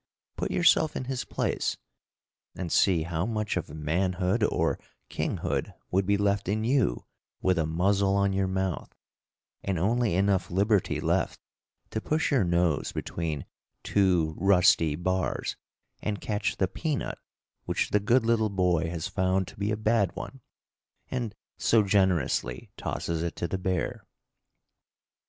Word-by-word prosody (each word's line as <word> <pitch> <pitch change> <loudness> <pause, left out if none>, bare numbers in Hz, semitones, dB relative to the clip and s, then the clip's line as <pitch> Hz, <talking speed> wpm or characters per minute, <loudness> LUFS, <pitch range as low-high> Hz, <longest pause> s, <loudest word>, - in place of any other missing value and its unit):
Put - - -2
yourself 160 -2 +3
in - - -2
his 130 -1 -2
place - - -1 0.8
and 90 -3 -4
see 90 -5 +4
how 85 +3 -2
much 110 -2 -1
of 90 - -3
manhood 90 +7 0
or - - +1 0.3
kinghood - - -2 0.2
would 95 +1 +1
be 100 0 +3
left 100 -1 +1
in 110 +2 0
you 120 - +1 0.3
with 95 -2 +2
a 80 - +1
muzzle 95 +4 +2
on 100 -1 +2
your 95 0 +1
mouth, 95 -2 -2 0.7
and 95 -2 -1
only 110 +2 +1
enough 95 0 +2
liberty 100 +2 +2
left - - 0 0.5
to 110 - -2
push 155 +6 0
your 135 -7 +4
nose 85 -4 +1
between 80 -5 -3 0.4
two 90 -6 +2
rusty 90 -5 +4
bars 90 +3 -1 0.5
and 105 -2 -2
catch 105 -1 -2
the 95 - +2
peanut 150 - -3 0.5
which - - -1
the 105 - +4
good 115 +4 +3
little 110 -2 +2
boy 90 -4 +1
has 85 +1 -3
found 95 0 0
to - - -14
be 100 +1 0
a 110 - 0
bad 110 -3 +1
one 135 - -7 0.7
and 120 -5 -3 0.2
so 115 -2 +4
generously 90 - +1
tosses 85 -1 -3
it 85 -1 -3
to 85 - -2
the 95 - -3
bear. 95 -2 -2
95 Hz, 145 wpm, -28 LUFS, 85-105 Hz, 0.8 s, see